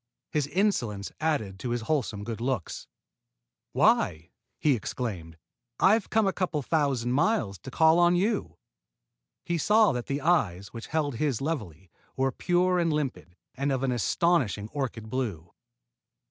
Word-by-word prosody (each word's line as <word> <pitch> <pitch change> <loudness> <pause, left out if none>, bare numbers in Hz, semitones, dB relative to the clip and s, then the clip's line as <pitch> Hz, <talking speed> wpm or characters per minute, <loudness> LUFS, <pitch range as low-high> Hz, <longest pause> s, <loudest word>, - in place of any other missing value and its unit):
His 150 -2 0
insolence 125 - 0
added 110 -12 -1
to 125 - -4
his 120 0 -1
wholesome 115 -6 -1
good 115 +1 -5
looks. 125 -8 -3 0.8
"Why?" 80 +2 +2 0.3
he 150 - +3
exclaimed. 100 -9 -4 0.4
"I've 210 +2 +4
come 220 -1 +3
a 195 - +1
couple 175 -5 -1
of - - -13
thousand 140 -7 +1
miles 130 - +1
to 135 - -9
call 160 +5 +4
on 175 0 +5
you." 205 +4 -1 0.9
He 170 -1 -1
saw 215 +5 +4
that 125 -2 -4
the 140 +1 -2
eyes 105 - +1
which 115 -1 -7
held 145 -5 -1
his 140 -3 0
levelly 100 - -4 0.3
were 135 0 +1
pure 180 +4 +1
and 165 -1 +1
limpid, 135 -12 -3 0.2
and 140 +2 -1
of 135 -1 -1
an 135 - +1
astonishing 120 - +1
orchid 125 -5 -4
blue. 100 -11 -3
135 Hz, 150 wpm, -27 LUFS, 110-165 Hz, 0.9 s, on